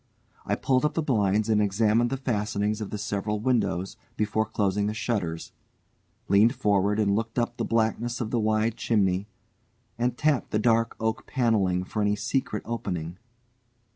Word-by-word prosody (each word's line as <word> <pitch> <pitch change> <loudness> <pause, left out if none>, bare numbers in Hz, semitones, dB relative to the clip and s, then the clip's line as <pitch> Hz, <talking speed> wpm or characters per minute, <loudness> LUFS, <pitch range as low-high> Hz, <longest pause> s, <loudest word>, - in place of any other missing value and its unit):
I - - +1
pulled 130 0 +1
up 150 - 0
the 165 - 0
blinds 105 -5 +1
and 110 -2 +3
examined 110 +3 +2
the 135 - -2
fastenings 105 -4 -1
of 105 - -4
the 105 - -4
several 105 +1 -2
windows 105 -6 0 0.2
before 110 +1 0
closing 105 -1 0
the 105 - -2
shutters, 100 -8 -2 0.8
leant 105 +5 +5
forward 105 -3 +1
and 100 -2 +2
looked 115 +2 -3
up 120 0 -1
the - - -1
blackness 115 +1 0
of 110 -2 -3
the 120 - +1
wide 110 +1 +1
chimney, 100 -3 +1 0.7
and 120 0 0
tapped 150 -5 +1
the - - 0
dark 115 +1 +2
oak 110 0 -2
panelling 105 -8 +1
for 105 +3 -3
any 105 0 +2
secret 110 +1 -2
opening. 90 -7 -4
110 Hz, 165 wpm, -26 LUFS, 100-115 Hz, 0.8 s, leant